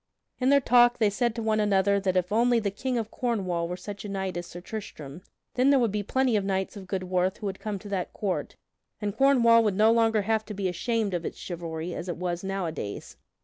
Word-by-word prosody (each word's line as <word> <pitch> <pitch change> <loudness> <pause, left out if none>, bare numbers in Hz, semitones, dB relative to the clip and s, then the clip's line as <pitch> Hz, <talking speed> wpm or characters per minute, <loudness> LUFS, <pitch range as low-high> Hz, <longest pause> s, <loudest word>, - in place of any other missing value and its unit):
In 255 0 +2
their 280 0 +6
talk 240 -2 +5
they 215 -3 +2
said 235 +2 0
to 230 - -3
one 215 -1 +1
another 200 -1 +3
that 185 -2 0
if 180 +1 0
only 235 +2 +3
the 205 -3 -1
King 250 +5 -2
of 220 -2 -3
Cornwall 185 -9 -1
were 180 +1 -4
such 200 +2 -8
a 205 - -6
knight 190 -2 -3
as 175 0 -4
Sir 175 - -9
Tristram, 175 -6 -8 0.3
then 255 +2 +3
there 280 - +5
would 235 -5 +2
be 210 +1 -1
plenty 255 +3 +1
of 205 - +1
knights 190 0 -2
of 195 -2 -9
good 190 0 -2
worth 185 +1 0
who - - -8
would 190 -1 -4
come 210 -2 -3
to 205 +2 -10
that 190 -3 -2
court, 195 -3 -3 0.4
and 205 -2 -3
Cornwall 235 -4 +5
would 210 -3 +1
no 215 +3 +5
longer 225 -2 +3
have 220 +1 +1
to 210 - -7
be 195 -1 -1
ashamed 215 +3 -1
of 175 -1 -2
its - - -5
chivalry 170 -1 -5
as 175 +2 -5
it 175 - -3
was 175 0 -3
nowadays. 175 - -4
200 Hz, 240 wpm, -27 LUFS, 185-225 Hz, 0.4 s, their